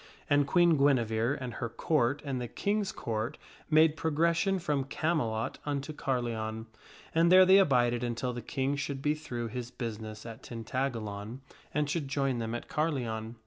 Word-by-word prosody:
And 145 -1 +3
Queen 170 0 +4
Guinevere 125 -2 +2
and 125 -2 -5
her 120 0 -4
Court 135 +2 0
and 135 -3 -2
the 120 - -3
King's 205 - -1
Court 110 0 -3 0.3
made 155 0 +5
progres 160 +2 +1
sion 195 +3 +2
from 150 -6 -1
Camelot 135 -7 -1
unto 145 +1 -3
Carleon, 115 -5 -2 0.5
and 165 +1 +4
there 185 0 +9
they 190 +2 +7
abided 120 -8 +3
until 120 +1 -2
the 120 - -5
King 135 +4 -1
should 140 -1 -4
be 150 - +3
through 120 -7 -5
his 120 +1 -5
business 110 -3 -6
at 115 -1 -8
Tintagalon 115 -2 -4 0.3
and 150 0 0
should 150 -1 -2
join 135 -3 0
them 115 0 -3
at 120 - -6
Carleon. 120 -8 -2
130 Hz, 165 wpm, -30 LUFS, 115-150 Hz, 0.5 s, there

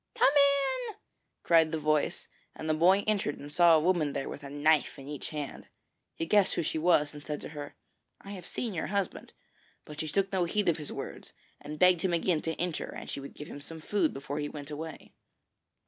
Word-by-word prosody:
Come 275 - +5
in!' 285 - +3 0.5
cried 165 -2 +5
the 160 - 0
voice, 155 -1 0 0.3
and 155 - -6
the 155 - +3
boy 185 +6 +4
entered 205 -9 0
and 145 +1 -9
saw 170 +1 +6
a - - +5
woman 160 -3 +1
there 135 - -3
with - - -7
a 140 - -7
knife 145 +1 +2
in 135 - -10
each 145 -1 -5
hand. 150 -2 -6 0.5
He - - -2
guessed 200 +3 +3
who - - 0
she 160 - -1
was, 155 -3 +3
and 150 -1 -10
said 150 -1 -4
to - - -7
her: 145 -1 -8 0.5
'I 200 - -10
have 185 -4 -8
seen 230 -4 -3
your 165 - -2
husband;' 200 -2 -2 0.5
but 150 0 -10
she 155 - -2
took 195 +5 0
no 185 -2 +2
heed 205 +2 +1
of 165 - +2
his 150 -2 -6
words, - - -7 0.3
and 150 +1 -7
begged 180 0 +5
him 185 -2 0
again 170 -1 +1
to 160 -1 -2
enter 175 -2 -3
and - - -7
she - - -4
would 140 0 -9
give 150 - -8
him 145 - -8
some 160 +3 -9
food 175 0 +1
before 140 +2 -5
he 145 0 -2
went 145 0 -8
on - - -3
his - - -8
way. 160 0 -8
160 Hz, 230 wpm, -30 LUFS, 150-185 Hz, 0.5 s, saw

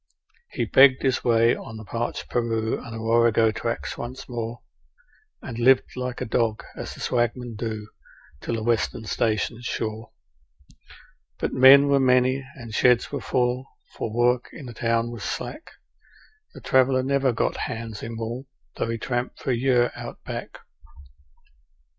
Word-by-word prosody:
He - - -1
begged 135 -1 +6
his 130 -2 +1
way 115 0 +4
on 110 - -9
the 110 - -9
parched 115 +3 -3
Paroo 115 -2 -1
and 120 - -9
the - - -5
Warrego 115 0 +3
tracks 115 +1 -4
once 125 +2 -7
more, 120 -1 -5 0.8
And 120 - -6
lived 130 +2 +4
like 125 -1 -4
a - - -1
dog, 110 -1 0
as - - -6
the - - -13
swagmen 120 0 -1
do, 110 -1 -4 0.5
till 115 - -2
the 110 - -3
Western 115 -1 0
stations 110 +2 -1
shore; 110 0 -4 1.3
But - - -2
men 135 +2 +8
were 140 -1 +4
many, 130 +1 +3
and 115 -4 -10
sheds 125 +2 +3
were - - -3
full, 125 0 0 0.3
for 110 - -4
work 120 +2 +2
in 140 - -10
the 120 - -8
town 115 0 0
was 115 -4 -7
slack 310 - -5 0.9
The - - -10
traveller 130 0 +3
never 135 0 +2
got 115 - -1
hands 110 -1 -6
in 115 0 -6
wool, 120 +4 -5 0.3
though - - -1
he 115 - -1
tramped 120 +2 -3
for 135 - -2
a - - +2
year 125 0 +2
Out - - -8
Back. - - -6
120 Hz, 160 wpm, -24 LUFS, 115-125 Hz, 1.3 s, men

